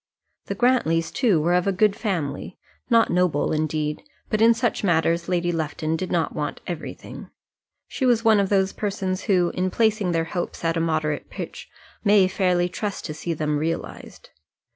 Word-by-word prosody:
The - - -3
Grantlys, 165 -10 +2
too, 220 - +2
were 170 +3 +1
of 180 +1 +2
a - - +3
good 205 +2 +2
family, 180 -8 -3 0.3
not 230 -2 +4
noble, 180 -4 +1
indeed; 155 -1 -1 0.3
but 215 -1 +1
in 230 +1 +6
such 240 -2 -1
matters 170 -1 +1
Lady 175 -1 +1
Lufton 160 -1 -2
did 180 +2 -4
not 170 -2 0
want 150 -1 -3
everything. 175 -4 -7 0.6
She 260 - -1
was 235 -2 +2
one 220 -2 +6
of 195 -1 +1
those 190 -1 +2
persons 195 -2 -3
who, 180 -5 +2
in 185 +1 0
placing 215 -2 +1
their 165 -1 +1
hopes 170 0 -4
at 165 0 +1
a - - 0
moderate 155 -2 -1
pitch, - - -7 0.3
may 205 -3 +5
fairly 180 -2 +1
trust 200 +2 -4
to 155 - -4
see 165 +2 -4
them 150 -1 -1
realized. 165 +2 -5
180 Hz, 175 wpm, -23 LUFS, 165-205 Hz, 0.6 s, in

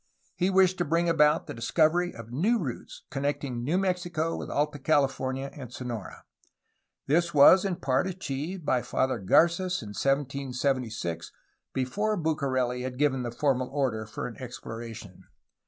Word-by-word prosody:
He 180 +1 +1
wished 185 -1 +4
to - - +3
bring 170 +2 +1
about 155 -2 +4
the - - -6
discovery 160 +9 +2
of 115 0 -11
new 195 - +2
routes 140 - -6
connecting 140 -3 -2
New 155 +8 +1
Mexico 175 -4 -1
with - - -6
Alta 150 0 -1
California 135 -2 0
and 130 -5 -9
Sonora. 120 -5 -6 0.8
This 170 +3 +1
was 150 +6 +8
in 190 -2 0
part 135 +1 0
achieved 175 -1 -4
by 125 -3 +2
Father 130 -1 0
Garc^s 170 - +3
in 105 - -8
1776 130 - -1 0.4
before 205 +12 -1
Bucareli 130 -6 0
had 125 0 -5
given 135 -2 +2
the 120 - -3
formal 130 +1 0
order 125 -6 -1
for - - -5
an 120 - -7
exploration. 115 -5 -8
140 Hz, 145 wpm, -28 LUFS, 125-170 Hz, 0.8 s, was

